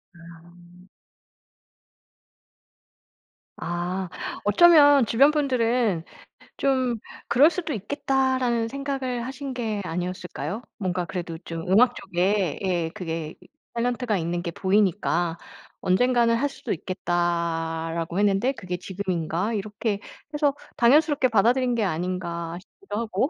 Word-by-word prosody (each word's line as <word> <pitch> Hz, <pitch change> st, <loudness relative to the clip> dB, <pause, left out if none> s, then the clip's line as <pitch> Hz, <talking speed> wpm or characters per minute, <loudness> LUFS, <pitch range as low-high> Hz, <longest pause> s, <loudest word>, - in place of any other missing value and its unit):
아. 175 Hz, +2 st, -16 dB, 2.7 s
아. 175 Hz, +2 st, -3 dB, 0.4 s
어쩌면 290 Hz, -, +7 dB
주변 275 Hz, +7 st, +5 dB
분들은 240 Hz, -, +1 dB, 0.5 s
'좀 260 Hz, -4 st, +1 dB, 0.3 s
그럴 280 Hz, +6 st, +6 dB
수도 340 Hz, -5 st, -3 dB
있겠다.'라는 255 Hz, 0 st, 0 dB
생각을 265 Hz, -2 st, -3 dB
하신 270 Hz, 0 st, -5 dB
게 220 Hz, -4 st, -2 dB
아니었을까요? 180 Hz, -, -4 dB, 0.2 s
뭔가 180 Hz, -3 st, -2 dB
그래도 175 Hz, -3 st, -5 dB
좀 165 Hz, -1 st, -5 dB
음악 240 Hz, +6 st, +5 dB
쪽에 185 Hz, -2 st, 0 dB
예 175 Hz, -3 st, 0 dB
그게 165 Hz, -4 st, -5 dB
이 -, -, -18 dB, 0.3 s
탤런트가 240 Hz, -2 st, 0 dB
있는 170 Hz, +1 st, -2 dB
게 170 Hz, -, -3 dB
보이니까 185 Hz, -3 st, +1 dB, 0.4 s
'언젠가는 235 Hz, +4 st, +3 dB
할 285 Hz, +4 st, 0 dB
수도 -, -, -4 dB
있겠다.'라고 170 Hz, -1 st, -2 dB
했는데 205 Hz, +5 st, +3 dB
'그게 180 Hz, -8 st, -5 dB
지금인가?' 185 Hz, +1 st, -2 dB
이렇게 210 Hz, 0 st, -2 dB, 0.3 s
해서 290 Hz, -2 st, +2 dB, 0.2 s
'당연스럽게 280 Hz, +1 st, +4 dB
받아들인 240 Hz, +3 st, +3 dB
게 225 Hz, -, +1 dB
아닌가.' 170 Hz, -1 st, -3 dB
싶기도 215 Hz, -, -9 dB
하고. 225 Hz, +5 st, 0 dB
200 Hz, 260 characters per minute, -25 LUFS, 175-250 Hz, 2.7 s, 어쩌면